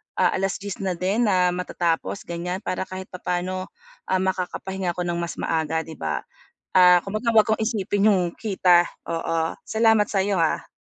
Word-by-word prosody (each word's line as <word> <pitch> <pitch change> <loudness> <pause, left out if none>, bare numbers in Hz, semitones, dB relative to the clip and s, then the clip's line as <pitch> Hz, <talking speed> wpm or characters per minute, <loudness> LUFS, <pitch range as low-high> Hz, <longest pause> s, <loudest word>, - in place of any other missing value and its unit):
ah, - - +3
10:00 195 +1 -3
na 190 -2 -1
din 195 +7 +1
na 180 -2 +3
matatapos, 175 0 -2
ganiyan, 180 +3 -4
para 185 - -2
kahit 185 0 -7
papaano, 180 +1 -3 0.4
ah, 185 - +1
makakapahinga 190 -1 -2
ko 180 - -3
ng 175 -1 -2
mas 170 -2 -4
maaga, 160 0 0
'di 160 - -10
ba, 80 -1 -2 0.5
ah, 180 -1 +8
kumbaga 215 +4 -2
'wag 220 -1 +5
kong 220 0 +1
isipin 210 -2 +1
yung 185 -2 +3
kita, 185 -5 +3 0.2
oo, 165 0 -1
salamat 220 -2 +3
sa'yo 200 0 +1
ha. 165 -1 0
185 Hz, 160 wpm, -24 LUFS, 175-200 Hz, 0.5 s, ah